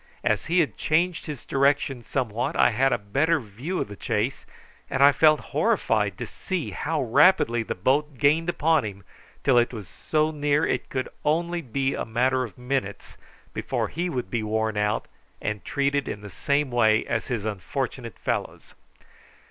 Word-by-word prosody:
As - - +1
he 175 +2 +4
had 155 - -2
changed 170 +3 0
his 150 -5 -7
direction 140 -2 +1
somewhat 120 -2 -2
I - - +4
had 135 +4 +2
a - - +2
better 140 +11 +1
view 125 - -5
of - - -2
the 100 - -9
chase, 110 +7 -2 0.4
and 135 - +2
I 140 - +9
felt 155 0 +5
horrified 105 -5 +1
to - - -4
see 185 -5 -4
how 155 -2 -1
rapidly 140 -1 +4
the 110 - -4
boat 140 +8 +1
gained 155 +5 +3
upon 160 -3 +2
him 100 -2 -7 0.4
till 125 -3 +5
it 120 +1 +1
was 105 -7 -7
so 155 - 0
near 145 -1 +1
that - - +2
it - - -4
could 130 -1 -2
be - - -12
only 150 -4 0
a - - -2
matter 130 +3 +1
of 115 - -8
minutes 125 -5 -3 0.4
before - - -2
he 175 +3 -2
would 125 - -4
be 115 - 0
worn 110 0 -1
out 105 +1 0 0.3
and 105 -1 -3
treated 140 -1 0
in 100 - -5
the 105 -1 -9
same 140 +3 0
way 110 -2 +3
as 115 -1 -2
his 115 -5 -2
unfortunate 105 -4 -4
fellows. - - -4
135 Hz, 180 wpm, -25 LUFS, 110-150 Hz, 0.4 s, I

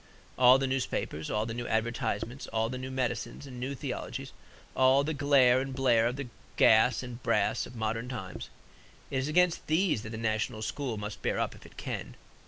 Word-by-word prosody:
All 125 +1 +7
the 135 - 0
newspapers, 130 - -2
all 105 +1 0
the 115 - -4
new 120 +1 -4
advertisements, 115 +1 -2
all 110 0 0
the 130 +1 -4
new 130 +1 -5
medicines 125 0 -3
and 125 -3 -9
new 135 +3 -3
theologies, - - -5 0.4
all 130 +2 +5
the 155 +2 -1
glare 135 -3 +4
and 135 -1 -5
blare 120 -4 +3
of 125 - -2
the 140 -1 -5 0.3
gas 110 +2 +5
and 125 0 -8
brass - - +1
of 125 - -12
modern 115 +2 -2
times 95 -8 -6 0.6
it 135 - -1
is 130 +1 0
against 180 +2 +2
these 160 - +2
that 110 - -7
the 110 - -6
national 110 -1 -1
school 125 -1 -3
must 105 0 -6
bear - - 0
up - - -1
if - - -14
it - - -20
can. - - -5
125 Hz, 195 wpm, -30 LUFS, 115-135 Hz, 0.6 s, All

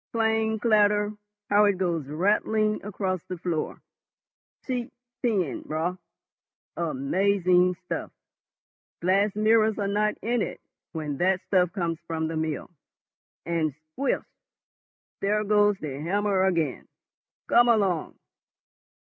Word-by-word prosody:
Clang, 220 -1 +1
clatter, 210 -2 +3 0.4
how 205 +1 +6
it 200 -2 +2
goes 170 -6 -1
rattling 215 +6 +1
across 190 -3 -2
the 185 - -6
floor! 170 -2 -3 0.8
Sheet 250 -2 -3 0.3
tin, 195 - 0
Raut,—amazing 180 +2 -1
stuff. - - -3 0.9
Glass 195 +4 +3
mirrors 215 0 +3
are 200 -2 -1
not 210 +1 +1
in 235 +1 +1
it - - -3 0.3
when 150 -3 -3
that 185 +3 +2
stuff 180 -3 +2
comes 170 -5 -2
from 160 -1 -2
the 165 - -4
mill. 155 +1 -3 0.7
And, 160 -4 -1 0.2
squelch!—there 210 - -4
goes 205 -1 +3
the 140 -6 -6
hammer 195 +3 +1
again. 165 -8 0 0.6
Come 240 0 +5
along!" 195 -8 +1
190 Hz, 105 wpm, -26 LUFS, 170-210 Hz, 0.9 s, how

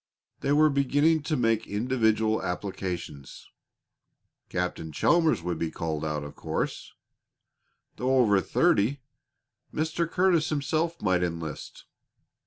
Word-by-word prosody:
They 140 - -1
were 155 +1 +5
beginning 145 +3 +2
to 155 - +1
make 115 -2 +1
individual 110 -1 +1
applications. 90 -6 -5 1.0
Captain 90 -3 -3
Chalmers 160 - +2
would 85 -2 -3
be 85 - -1
called 80 -1 -4
out, 75 -1 -2
of 75 - -9
course. - - -4 1.0
Though 130 +1 +1
over 105 -6 +4
thirty, 125 +10 +1 0.7
Mr. 160 +2 -1
Curtis 175 -3 +2
himself 155 +3 -1
might 95 -3 +2
enlist. 85 -3 -5
110 Hz, 110 wpm, -27 LUFS, -, 1.0 s, were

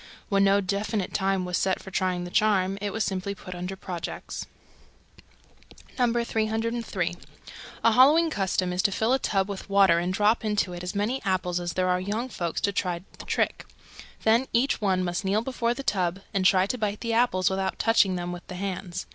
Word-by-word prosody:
When 195 -1 +3
no 200 +1 +4
definite 200 +1 -2
time 190 -1 0
was 180 -1 -1
set 190 -1 +1
for 190 - -11
trying 185 -1 0
the 175 - -7
charm, 195 -2 +2
it 205 -1 -2
was 220 +1 -1
simply 195 0 -3
put 185 -2 -9
under 180 +2 -5
"projects." 180 -2 -6 1.5
303. 230 -5 0 0.7
A 230 - +6
Halloween 300 +8 +5
custom 185 -4 0
is 180 - +1
to 200 - +2
fill 220 +5 +1
a 265 - +3
tub 195 -5 0
with 200 -1 -7
water 195 -4 +5
and 175 +1 -1
drop 210 +4 +2
into 210 -4 0
it 175 - -6
as 180 +3 -5
many 220 +6 -1
apples 185 -3 0
as 175 -1 -3
there 185 0 0
are 180 0 +2
young 215 +6 -2
folks 170 -7 -3
to 200 - +1
try 180 -3 -2 0.2
the - - -9
trick. - - 0 0.6
Then 230 +4 +3
each 240 +2 +2
one 190 -3 +1
must 175 +2 -2
kneel 200 +3 +1
before 240 -2 -1
the 275 - -6
tub 185 -4 0
and 190 -1 0
try 185 0 +5
to 250 +5 -3
bite 210 -1 -2
the 230 -1 -1
apples 210 -6 +2
without 190 0 -1
touching 210 -4 +3
them 175 0 -3
with 175 0 -8
the 180 - -7
hands. 185 -1 -4
195 Hz, 195 wpm, -26 LUFS, 185-220 Hz, 1.5 s, A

